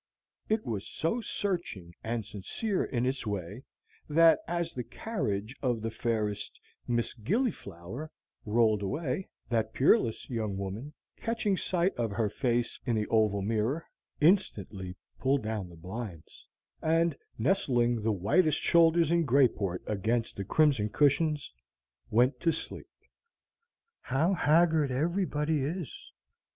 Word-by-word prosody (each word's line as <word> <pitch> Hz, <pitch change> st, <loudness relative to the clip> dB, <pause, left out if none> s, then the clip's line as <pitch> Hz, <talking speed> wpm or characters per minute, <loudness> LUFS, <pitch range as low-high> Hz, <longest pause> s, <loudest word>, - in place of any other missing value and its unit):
It 220 Hz, 0 st, +1 dB
was 105 Hz, -4 st, -3 dB
so 195 Hz, +10 st, -1 dB
searching 170 Hz, -, -3 dB
and 115 Hz, -1 st, -2 dB
sincere 190 Hz, -, -2 dB
in 120 Hz, -1 st, -1 dB
its 130 Hz, -2 st, -2 dB
way, 100 Hz, +2 st, -4 dB, 0.5 s
that, 165 Hz, +2 st, +6 dB
as 170 Hz, -1 st, -2 dB
the 125 Hz, -, -4 dB
carriage 115 Hz, -, -3 dB
of 125 Hz, -4 st, +1 dB
the 115 Hz, -, -2 dB
fairest 110 Hz, -3 st, -2 dB, 0.3 s
Miss 120 Hz, -1 st, 0 dB
Gillyflower 135 Hz, -, -3 dB, 0.3 s
rolled 110 Hz, -1 st, +3 dB
away, 140 Hz, -, -2 dB, 0.2 s
that 110 Hz, -2 st, 0 dB
peerless 130 Hz, -, +3 dB
young 110 Hz, -5 st, -2 dB
woman, 105 Hz, +10 st, -5 dB, 0.2 s
catching 225 Hz, -3 st, 0 dB
sight 185 Hz, 0 st, 0 dB
of 115 Hz, -2 st, 0 dB
her 105 Hz, +1 st, 0 dB
face 120 Hz, 0 st, -1 dB
in 120 Hz, -3 st, 0 dB
the 105 Hz, -1 st, 0 dB
oval 105 Hz, -3 st, +2 dB
mirror, 115 Hz, +9 st, 0 dB, 0.3 s
instantly 105 Hz, -, +1 dB, 0.2 s
pulled 135 Hz, 0 st, +2 dB
down 105 Hz, -4 st, -3 dB
the 85 Hz, -, -13 dB
blinds, 90 Hz, 0 st, -8 dB, 0.3 s
and, 165 Hz, 0 st, +2 dB, 0.2 s
nestling 120 Hz, -, +2 dB
the 110 Hz, +1 st, +1 dB
whitest 145 Hz, -, +2 dB
shoulders 165 Hz, -1 st, +4 dB
in 170 Hz, 0 st, +3 dB
Greyport 120 Hz, -, +2 dB
against 110 Hz, +3 st, -1 dB
the 100 Hz, -, -3 dB
crimson 135 Hz, -2 st, +3 dB
cushions, 145 Hz, -, +2 dB, 0.6 s
went 125 Hz, +5 st, +3 dB
to 165 Hz, -, +2 dB
sleep. 160 Hz, -, -7 dB, 1.1 s
"How 145 Hz, +9 st, +1 dB
haggard 160 Hz, -3 st, +3 dB
everybody 155 Hz, +1 st, 0 dB
is! 165 Hz, +1 st, -3 dB
125 Hz, 125 wpm, -30 LUFS, 110-165 Hz, 1.1 s, that